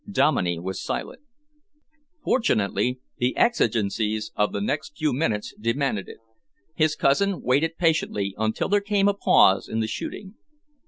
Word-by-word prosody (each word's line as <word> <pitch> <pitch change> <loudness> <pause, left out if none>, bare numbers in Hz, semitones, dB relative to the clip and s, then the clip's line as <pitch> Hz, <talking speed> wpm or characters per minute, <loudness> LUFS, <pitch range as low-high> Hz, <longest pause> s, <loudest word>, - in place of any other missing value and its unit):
Dominey 90 - +1
was 95 +3 -5
silent. - - -5 1.0
Fortunately, 125 - +1 0.2
the 125 +1 0
exigencies 110 - +1
of 105 0 +1
the - - -3
next 145 +9 -3
few 155 -4 0
minutes 115 -7 -1
demanded 115 -2 -1
it. - - -10 0.6
His 155 -1 +1
cousin 195 +8 +1
waited 155 +6 +1
patiently 155 - 0
until 110 0 0
there 205 +1 +2
came 200 -1 +1
a 205 - +3
pause 95 - +4
in 110 - -2
the 110 - 0
shooting. 190 - -6
125 Hz, 140 wpm, -24 LUFS, 105-165 Hz, 1.0 s, pause